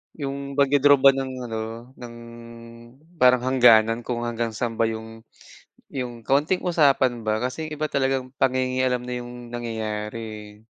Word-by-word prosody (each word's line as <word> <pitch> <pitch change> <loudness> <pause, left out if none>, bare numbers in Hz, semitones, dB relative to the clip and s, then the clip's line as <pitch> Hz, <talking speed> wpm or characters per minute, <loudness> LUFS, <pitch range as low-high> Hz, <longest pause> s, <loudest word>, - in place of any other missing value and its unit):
Iyong 140 -1 -5
pagdo-draw 145 0 +5
ba 135 0 +7
ng 135 -1 -4 0.2
ano, 115 +2 -6
ng 120 -1 -9 1.0
parang 125 -1 +5
hangganan 120 -3 +5
kung 120 -1 -2
hanggang 115 -1 -3
saan 115 0 -3
ba 115 - +3
iyong 110 0 -7 0.7
iyong 125 -3 -5
kaunting 145 +7 +2
usapan 135 -8 +2
ba. 110 0 0
Kasi 130 +6 -3
yung - - -4
iba 155 - +1
talagang 135 -1 -1
panginge-alam 130 -1 +1
na 125 - -4
iyong 120 0 -8
nangyayari, 110 -2 -4
eh. 105 -2 -9
125 Hz, 145 wpm, -24 LUFS, 115-135 Hz, 1.0 s, ba